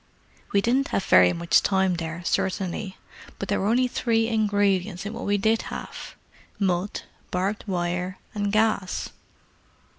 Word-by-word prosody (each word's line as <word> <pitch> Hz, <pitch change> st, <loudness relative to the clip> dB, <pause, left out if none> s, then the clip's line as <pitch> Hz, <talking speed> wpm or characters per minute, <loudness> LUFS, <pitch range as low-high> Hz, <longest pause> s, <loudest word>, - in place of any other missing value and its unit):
We 200 Hz, -, +3 dB
didn't 255 Hz, +6 st, +2 dB
have 195 Hz, -, -1 dB
very 90 Hz, 0 st, +6 dB
much 170 Hz, 0 st, +3 dB
time 190 Hz, -2 st, +2 dB
there, 165 Hz, +1 st, -5 dB
certainly, 190 Hz, +1 st, -1 dB, 0.4 s
but -, -, -5 dB
there -, -, +1 dB
were 195 Hz, -, 0 dB
only 250 Hz, +3 st, +3 dB
three 225 Hz, -2 st, +1 dB
ingredients 205 Hz, -3 st, +1 dB
in 210 Hz, -, -4 dB
what -, -, -5 dB
we 205 Hz, 0 st, +2 dB
did 220 Hz, +3 st, +2 dB
have—mud, 190 Hz, 0 st, -4 dB, 0.3 s
barbed 195 Hz, +3 st, -1 dB
wire, 180 Hz, 0 st, -2 dB, 0.2 s
and 205 Hz, -1 st, -1 dB
gas." 215 Hz, -3 st, +1 dB
195 Hz, 140 wpm, -25 LUFS, 180-215 Hz, 0.4 s, very